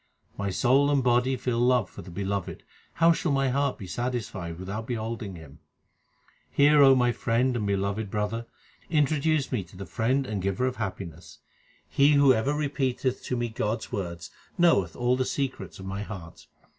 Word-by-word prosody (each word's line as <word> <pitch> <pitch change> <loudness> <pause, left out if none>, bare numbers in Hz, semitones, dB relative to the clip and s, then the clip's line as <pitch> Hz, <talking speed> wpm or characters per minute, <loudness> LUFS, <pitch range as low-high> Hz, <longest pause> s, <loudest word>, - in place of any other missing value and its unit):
My 100 0 -2
soul 130 +8 +3
and 140 -2 +2
body 125 +1 +2
feel 125 -2 -1
love 125 -3 +3
for - - -11
the 90 - -11
Beloved; 95 +1 -4 0.3
how 165 0 +5
shall 170 -1 0
my 135 -1 +2
heart 140 +1 0
be 100 - -8
satisfied 95 -7 -4
without 100 +5 -5
beholding 110 -4 -4
Him? 80 -2 -13 0.9
Hear, 140 -2 +6
my 125 -1 +3
friend 120 +2 0
and 105 -3 -1
beloved 100 +1 -1
brother, 105 +3 -2 0.4
introduce 150 -1 +1
me 120 -7 -1
to 90 +2 -16
the 95 - -6
Friend 130 +7 0
and 105 -5 -3
Giver 100 +6 0
of 130 -1 -2
happiness. 85 -7 -6 0.5
He 140 +2 +4
who 140 -2 +6
ever 110 +4 0
repeateth 135 -3 -1
to 125 - -2
me 120 0 -1
God 110 0 -1
s - - -9
words 85 -4 -5 0.3
knoweth 100 - +3
all 125 +1 +1
the 130 - 0
secrets 135 0 -3
of 95 - -9
my 95 +1 -4
heart. 95 -6 -9
120 Hz, 175 wpm, -27 LUFS, 100-135 Hz, 0.9 s, Hear